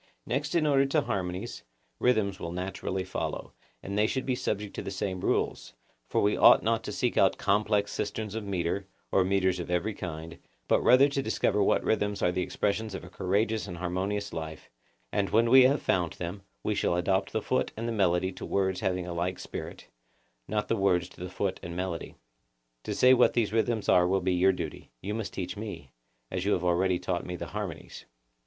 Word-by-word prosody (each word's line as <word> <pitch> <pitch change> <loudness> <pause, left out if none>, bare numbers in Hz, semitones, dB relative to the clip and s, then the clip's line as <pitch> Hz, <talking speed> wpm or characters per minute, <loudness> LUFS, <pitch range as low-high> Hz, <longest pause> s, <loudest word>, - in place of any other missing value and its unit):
Next 145 +6 -2
in 165 -2 +3
order 140 -2 +4
to 150 +2 +2
harmonies, 90 -6 -3 0.4
rhythms 110 -6 +2
will 85 - -5
naturally 95 +1 -3
follow, - - -4 0.3
and 100 - -4
they 105 +1 +3
should 130 +2 -2
be 130 - +1
subject 105 -4 -2
to - - -4
the - - -5
same 95 -1 -3
rules, - - -1 0.4
for - - +1
we 105 +1 +3
ought - - +7
not 115 +1 +1
to - - -4
seek 125 - -1
out 95 - +4
complex 105 0 +1
systems 105 0 -3
of 110 -1 -3
metre, 95 0 -2 0.2
or 95 - +4
metres 95 -1 +1
of 85 - -5
every 90 +5 0
kind, 85 -3 -7 0.3
but - - +3
rather 130 +3 +6
to 140 0 -1
discover 105 -3 +1
what 100 - +3
rhythms 105 -1 0
are 90 - +3
the 90 +1 -1
expressions 105 +2 -1
of - - -6
a 90 - -11
courageous 105 +4 0
and 90 -2 -6
harmonious 95 +4 -2
life; 80 -1 -6 0.4
and 100 -1 0
when 115 +2 +3
we 130 0 +9
have 140 +3 +2
found 90 -3 +1
them, 90 +3 -6 0.2
we 105 - 0
shall 90 - +1
adapt 95 +2 +1
the - - 0
foot 130 +4 0
and 115 +1 -3
the - - -1
melody 95 -3 +2
to - - -10
words 95 -1 0
having 90 -1 -1
a 90 - -5
like 90 +2 -2
spirit, - - -7 0.6
not 105 -1 -1
the - - +1
words 95 -3 +2
to - - -15
the 90 - -4
foot 95 +1 -2
and 85 0 -7
melody. 90 -2 -4 0.7
To - - -2
say 130 0 +6
what 130 - +5
these 110 -3 +1
rhythms 115 -1 0
are 90 0 +5
will 95 +2 +2
be 90 +1 +1
your 90 +2 +4
duty—you 90 0 -6
must 110 -1 -3
teach 90 -1 -4
me 105 -2 -5
them, 80 -4 -16 0.5
as - - -3
you 100 - +2
have 90 - 0
already 90 +1 +2
taught 90 0 -2
me 90 - -5
the - - -5
harmonies. - - -6
95 Hz, 210 wpm, -29 LUFS, 90-110 Hz, 0.7 s, we